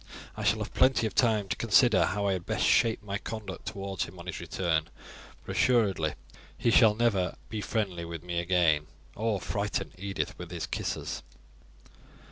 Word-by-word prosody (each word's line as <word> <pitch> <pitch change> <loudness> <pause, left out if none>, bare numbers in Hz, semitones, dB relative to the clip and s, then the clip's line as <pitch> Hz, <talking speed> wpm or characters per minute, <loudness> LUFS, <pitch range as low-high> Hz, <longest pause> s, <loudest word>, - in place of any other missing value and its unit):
I 110 - -5
shall 110 +1 +3
have 105 - -5
plenty 130 -3 +4
of 110 - -2
time 110 -5 +2
to - - -1
consider 115 -1 +4
how 100 0 -1
I 100 - +2
had 90 -2 -4
best - - 0
shape 115 -2 +3
my 100 -1 -3
conduct 105 -6 -7
towards 95 -2 -3
him 90 - -12
on 85 - -10
his 90 - -5
return; 85 -1 -1 0.6
but - - -5
assuredly 100 -10 +2 0.4
he 115 - +2
shall 110 -2 +6
never 105 -6 +1
be 110 -1 -3
friendly 100 -6 -2
with 85 -1 -6
me 90 -1 -2
again, 85 -4 +2 0.3
or 110 -2 0
frighten 100 +2 -2
Edith 100 0 -3
with 90 -1 -7
his 85 -2 -4
kisses." - - -3
100 Hz, 175 wpm, -29 LUFS, 85-110 Hz, 0.6 s, shall